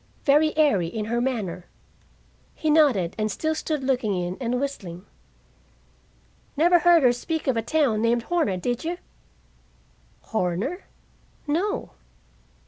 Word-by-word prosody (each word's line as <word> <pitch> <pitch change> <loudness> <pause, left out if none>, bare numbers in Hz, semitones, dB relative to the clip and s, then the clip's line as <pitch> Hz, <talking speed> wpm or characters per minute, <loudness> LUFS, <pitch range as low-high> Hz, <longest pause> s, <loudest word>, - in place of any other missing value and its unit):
Very 305 +2 +3
airy 245 - +3
in 210 +5 -4
her 235 +2 -1
manner." 195 -9 -3 0.9
He 310 - 0
nodded 265 - +3
and 215 0 0
still 315 +9 -1
stood 310 -2 -3
looking 250 -6 0
in 180 0 -3
and 245 0 -1
whistling. 195 -10 -5 1.5
"Never 345 +3 +5
heard 345 -3 +5
her 245 -1 +5
speak 320 +6 -4
of 265 -4 +1
a 225 - +1
town 235 -3 +1
named 230 +1 +1
Horner, 315 - 0
did 245 +6 -2
you?" 340 +2 -3 1.2
"Horner? 195 - -2 0.6
No." 380 +10 -1
250 Hz, 130 wpm, -24 LUFS, 210-315 Hz, 1.5 s, Never